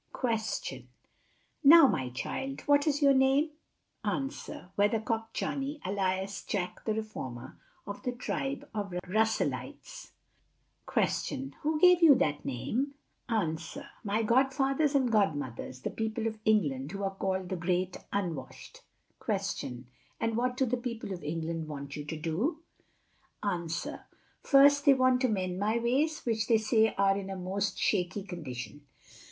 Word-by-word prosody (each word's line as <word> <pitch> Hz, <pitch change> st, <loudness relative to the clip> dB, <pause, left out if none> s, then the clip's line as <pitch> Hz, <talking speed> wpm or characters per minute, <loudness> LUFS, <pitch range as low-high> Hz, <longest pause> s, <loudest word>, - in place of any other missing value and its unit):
Question. 225 Hz, -4 st, -2 dB, 0.8 s
Now 325 Hz, +2 st, +10 dB
my 130 Hz, -, +1 dB
child, 270 Hz, -, -4 dB
what 285 Hz, +1 st, +3 dB
is 290 Hz, 0 st, +1 dB
your 280 Hz, -1 st, +7 dB
Name? 270 Hz, +4 st, +3 dB, 0.5 s
Answer. 270 Hz, -6 st, -4 dB
Weathercock 225 Hz, +2 st, 0 dB
Johnny, 280 Hz, +4 st, -3 dB
alias 190 Hz, 0 st, -1 dB
Jack 180 Hz, -3 st, -3 dB
the 220 Hz, -, +1 dB
Reformer, 130 Hz, -, -6 dB, 0.3 s
of 200 Hz, -, -6 dB
the 250 Hz, -, -2 dB
tribe 270 Hz, +2 st, -3 dB
of 200 Hz, -4 st, -3 dB
Russellites. 220 Hz, -, -1 dB, 0.8 s
Q. 270 Hz, 0 st, 0 dB
Who 305 Hz, +1 st, 0 dB
gave 360 Hz, +1 st, +7 dB
you 315 Hz, -4 st, +9 dB
that 145 Hz, -, 0 dB
Name? 250 Hz, -, -2 dB, 0.3 s
A. 195 Hz, -9 st, +1 dB, 0.5 s
My 215 Hz, +1 st, 0 dB
Godfathers 270 Hz, +5 st, +2 dB
and 260 Hz, -4 st, +3 dB
Godmothers, 145 Hz, -, -1 dB
the -, -, -3 dB
People 220 Hz, 0 st, -2 dB
of 220 Hz, -1 st, -2 dB
England, 150 Hz, -9 st, +1 dB
who 200 Hz, 0 st, -4 dB
are 195 Hz, 0 st, -1 dB
called 190 Hz, -1 st, -2 dB
the 185 Hz, -, -1 dB
great 180 Hz, +1 st, -1 dB
unwashed. 180 Hz, -7 st, -4 dB, 0.4 s
Q. 125 Hz, 0 st, -3 dB, 0.3 s
And 225 Hz, -1 st, 0 dB
what 250 Hz, +2 st, 0 dB
do 265 Hz, -, +3 dB
the 250 Hz, +1 st, 0 dB
People 235 Hz, -5 st, -5 dB
of 175 Hz, -, -8 dB
England 165 Hz, +1 st, -3 dB
want 140 Hz, -2 st, -6 dB
you 150 Hz, -, -5 dB
to 160 Hz, +1 st, -5 dB
do? 210 Hz, -, -2 dB, 0.8 s
A. 180 Hz, -5 st, -1 dB, 0.7 s
First, 285 Hz, +1 st, +6 dB
they 280 Hz, -2 st, +7 dB
want 255 Hz, -1 st, +3 dB
to 260 Hz, -, +4 dB
amend 185 Hz, -4 st, -1 dB
my 215 Hz, +3 st, +1 dB
ways, 270 Hz, +7 st, +1 dB
which 220 Hz, -2 st, 0 dB
they 230 Hz, -, +5 dB
say 220 Hz, 0 st, +2 dB
are 195 Hz, 0 st, +4 dB
in 195 Hz, -1 st, -4 dB
a 195 Hz, -, -4 dB
most 190 Hz, +2 st, -2 dB
shaky 190 Hz, 0 st, 0 dB
condition. 145 Hz, -, -7 dB
215 Hz, 145 wpm, -30 LUFS, 180-265 Hz, 0.8 s, Now